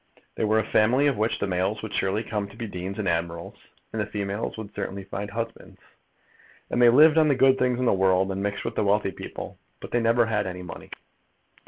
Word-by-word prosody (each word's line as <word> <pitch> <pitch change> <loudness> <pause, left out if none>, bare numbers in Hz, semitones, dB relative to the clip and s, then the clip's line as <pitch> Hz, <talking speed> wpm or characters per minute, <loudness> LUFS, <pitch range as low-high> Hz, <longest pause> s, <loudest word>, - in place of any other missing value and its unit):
They - - -1
were 110 +1 +2
a 110 - +2
family 120 +7 +3
of 140 -2 +3
which 110 +2 0
the - - -1
males 95 +3 -1
would 110 - -6
surely 100 +3 0
come 105 -3 -3
to 100 - -15
be 115 - -4
deans 95 -1 -6
and 105 -3 -2
admirals, 85 0 -2 0.4
and 110 - -1
the 105 - -2
females 100 +1 -4
would 110 -2 -8
certainly 100 +1 -5
find 100 +1 -5
husbands. 115 +2 -6 0.9
And 120 - +1
they 120 - +8
lived 155 +6 +7
on 155 - +4
the 140 - +3
good 135 0 +4
things 125 -1 +1
of 130 - -1
the - - +4
world, 95 0 +2
and 95 0 -3
mixed 100 0 -3
with - - -3
wealthy 100 -1 +2
people. - - -8 0.2
But - - -9
they 120 - +2
never 115 +1 +3
had 105 -3 -1
any 90 0 -6
money. 90 - -9
105 Hz, 225 wpm, -25 LUFS, 95-115 Hz, 0.9 s, they